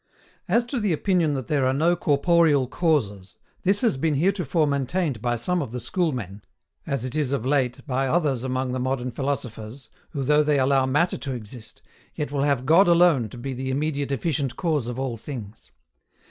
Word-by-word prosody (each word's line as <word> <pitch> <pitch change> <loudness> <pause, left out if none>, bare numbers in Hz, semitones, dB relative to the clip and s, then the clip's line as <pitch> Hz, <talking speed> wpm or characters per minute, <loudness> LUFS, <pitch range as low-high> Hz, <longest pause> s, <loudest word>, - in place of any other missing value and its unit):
53. - - +1
As 235 0 +3
to 250 +1 -3
the 205 -5 +1
OPINION 170 -2 +1
THAT 130 -4 -4
THERE 140 -4 +1
ARE 130 - +2
NO 165 +5 +2
CORPOREAL 150 -2 +3
CAUSES, 105 - -1 0.2
this 195 +2 +1
has 230 - +2
been 155 +2 0
heretofore 170 -1 +1
maintained 140 - -1
by 120 0 0
some 175 +10 -1
of 135 - -5
the 125 - -4
Schoolmen, 120 - -2 0.5
as 135 -3 -1
it 130 - -4
is 150 -4 0
of 135 -4 -1
late 130 -3 0
by 135 -2 0
others 140 -5 +1
among 130 0 -2
the 130 - -2
modern 125 -1 -2
philosophers, 125 -3 -5 0.2
who 140 - -4
though 150 +3 +4
they 150 -1 +2
allow 135 0 +3
Matter 150 +7 +1
to 135 -2 -4
exist, 115 -1 -10 0.3
yet 150 -2 -3
will 140 -1 -1
have 140 -3 +1
God 170 +7 +5
alone 170 -9 +4
to 120 - -11
be 135 +3 -5
the 130 +1 -4
immediate 140 0 -1
efficient 135 -2 -1
cause 155 -9 -1
of 120 0 -5
all 130 -3 -3
things. 115 -4 -9
140 Hz, 195 wpm, -24 LUFS, 125-155 Hz, 0.5 s, God